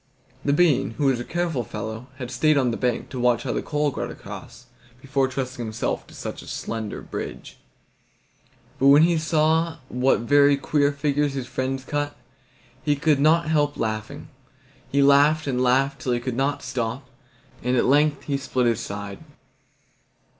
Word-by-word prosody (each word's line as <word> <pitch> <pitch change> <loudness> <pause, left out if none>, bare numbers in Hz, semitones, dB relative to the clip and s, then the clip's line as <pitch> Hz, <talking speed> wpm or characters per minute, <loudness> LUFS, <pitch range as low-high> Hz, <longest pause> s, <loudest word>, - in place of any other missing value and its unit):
The 145 - +1
bean, 140 -7 +2
who 145 - 0
was 135 -3 +2
a - - -3
careful 170 -4 -2
fellow, 110 +3 -6
had 125 -2 -6
stayed 150 +4 +3
on 130 -3 +2
the - - -2
bank, 125 -2 -1
to 130 - -6
watch 120 -1 +2
how - - -2
the - - -1
coal 150 -1 0
got - - -4
across, - - -10 0.3
before 135 0 0
trusting 130 -2 -4
himself 110 -1 -3
to - - -15
such - - -6
a - - -13
slender 110 -2 -5
bridge. - - -7 1.2
But 135 - +4
when 145 +3 +8
he 170 -1 +3
saw 160 +1 +1
what 125 -1 +2
very 140 +3 +4
queer 145 +1 +1
figures 145 0 0
his 130 -2 -3
friends 130 +1 -3
cut, 145 +1 -3 0.6
he 145 +1 +1
could 145 0 +2
not 160 +3 +4
help 145 -2 +1
laughing. 110 -1 -4 0.6
He 140 0 +3
laughed 145 +3 +5
and 130 -3 -1
laughed 135 +2 +2
till 125 - 0
he 120 - 0
could 120 0 -4
not 135 +3 -1
stop, 120 +2 -3 0.5
and 125 +1 +1
at - - +3
length 145 +2 +3
he 140 -2 -1
split 130 -2 -1
his 115 -1 +2
side. 100 -3 -6
135 Hz, 175 wpm, -24 LUFS, 125-145 Hz, 1.2 s, when